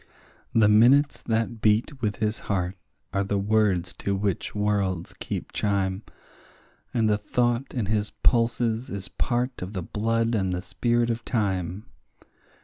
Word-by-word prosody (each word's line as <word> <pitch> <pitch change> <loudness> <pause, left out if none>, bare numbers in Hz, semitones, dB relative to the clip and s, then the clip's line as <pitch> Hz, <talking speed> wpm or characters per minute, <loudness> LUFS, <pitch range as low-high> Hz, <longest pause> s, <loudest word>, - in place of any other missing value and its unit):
The 110 -2 +6
minutes 125 +7 +5
that 115 0 -1
beat 115 +6 +2
with 105 -3 0
his 110 +2 -1
heart 90 -2 0 0.4
are 100 +1 +1
the 100 +1 -1
words 100 -3 +1
to 100 - -1
which 100 0 -2
worlds 100 -4 0
keep - - -4
chime, 100 -2 0 0.9
And 115 -3 +2
the 105 -1 +2
thought 120 +4 0
in 120 -5 0
his 105 +1 0
pulses 115 0 +1
is 95 -3 -6
part 125 +1 -1
of 90 +3 -5
the 95 -3 -3
blood 115 +4 0
and 95 -4 0
the 90 0 -3
spirit 120 +6 +1
of 115 +1 -3
time. 95 -3 -1
105 Hz, 145 wpm, -26 LUFS, 100-115 Hz, 0.9 s, The